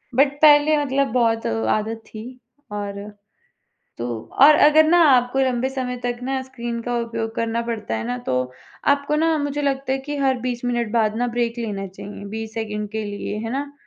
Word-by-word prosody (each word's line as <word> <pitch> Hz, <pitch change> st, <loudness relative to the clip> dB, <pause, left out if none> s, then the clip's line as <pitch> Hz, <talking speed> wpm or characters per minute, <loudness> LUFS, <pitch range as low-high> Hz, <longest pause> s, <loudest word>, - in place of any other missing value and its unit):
But 275 Hz, +1 st, +4 dB
पहले 300 Hz, 0 st, +6 dB
मतलब 275 Hz, -1 st, +1 dB
बहुत 230 Hz, -2 st, +2 dB, 0.3 s
आदत 220 Hz, +1 st, -3 dB
थी 215 Hz, -, -9 dB, 0.5 s
और 205 Hz, -1 st, -4 dB, 1.0 s
तो 120 Hz, -, -3 dB, 0.4 s
और 300 Hz, +1 st, +9 dB
अगर 310 Hz, +1 st, +6 dB
ना 345 Hz, +2 st, +5 dB
आपको 250 Hz, +1 st, +3 dB
लंबे 260 Hz, -1 st, +1 dB
समय 255 Hz, -2 st, -3 dB
तक 240 Hz, 0 st, -1 dB
ना 265 Hz, +1 st, -1 dB
स्क्रीन 240 Hz, -3 st, -5 dB
का 245 Hz, 0 st, -2 dB
उपयोग 225 Hz, -1 st, -4 dB
करना 230 Hz, 0 st, -1 dB
पड़ता 225 Hz, -, -4 dB
है 110 Hz, -, -4 dB
ना 125 Hz, 0 st, -2 dB
तो, 125 Hz, 0 st, -1 dB, 0.3 s
आपको 285 Hz, +1 st, +2 dB
ना 325 Hz, +1 st, +2 dB
मुझे 290 Hz, 0 st, -2 dB
लगता 270 Hz, -1 st, -1 dB
है 270 Hz, -, 0 dB
कि 290 Hz, +2 st, -5 dB
हर 265 Hz, -2 st, +1 dB
20 245 Hz, -1 st, -3 dB
मिनट 240 Hz, -3 st, -1 dB
बाद 220 Hz, -2 st, +2 dB
ना 245 Hz, +1 st, 0 dB
ब्रेक 235 Hz, 0 st, 0 dB
लेना 205 Hz, -4 st, -3 dB
चाहिए 200 Hz, +2 st, -10 dB
20 220 Hz, 0 st, -6 dB
सेकंड 210 Hz, -2 st, -3 dB
के 220 Hz, -1 st, -3 dB
लिए, 205 Hz, 0 st, -5 dB
है 225 Hz, +1 st, -4 dB
ना? 280 Hz, +1 st, -3 dB
240 Hz, 190 wpm, -22 LUFS, 220-270 Hz, 1.0 s, और